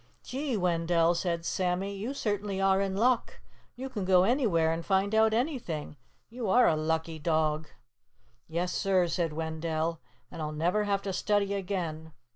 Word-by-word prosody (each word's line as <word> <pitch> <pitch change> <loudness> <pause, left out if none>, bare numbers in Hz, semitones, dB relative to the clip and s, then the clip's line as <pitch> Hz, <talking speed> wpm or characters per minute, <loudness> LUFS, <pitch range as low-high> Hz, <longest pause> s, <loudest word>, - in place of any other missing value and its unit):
"Gee, 265 -2 -2
Wendell!" 170 -2 +2
said 170 -1 -2
Sammy. 185 +3 -1
"You 225 +8 -4
certainly 205 -4 -2
are 195 0 +3
in 195 -1 -1
luck. 240 +2 +1 0.4
You 260 +2 -5
can 220 -7 -4
go 185 -1 +5
anywhere 195 - +2
and 165 +1 -2
find 195 +2 +1
out 220 0 +4
anything. 225 - -2 0.3
You 230 -3 -4
are 245 +5 +5
a 160 - +3
lucky 160 +1 -1
dog!" 155 -1 0 0.8
"Yes 175 +3 -2
sir!" 190 -3 +2
said 170 -1 -1
Wendell. 160 +1 -2 0.3
"And - - -7
I'll 155 0 -3
never 175 +7 +1
have 200 -1 0
to 195 - -3
study 200 +1 +1
again. 170 -5 -4
185 Hz, 160 wpm, -29 LUFS, 165-205 Hz, 0.8 s, go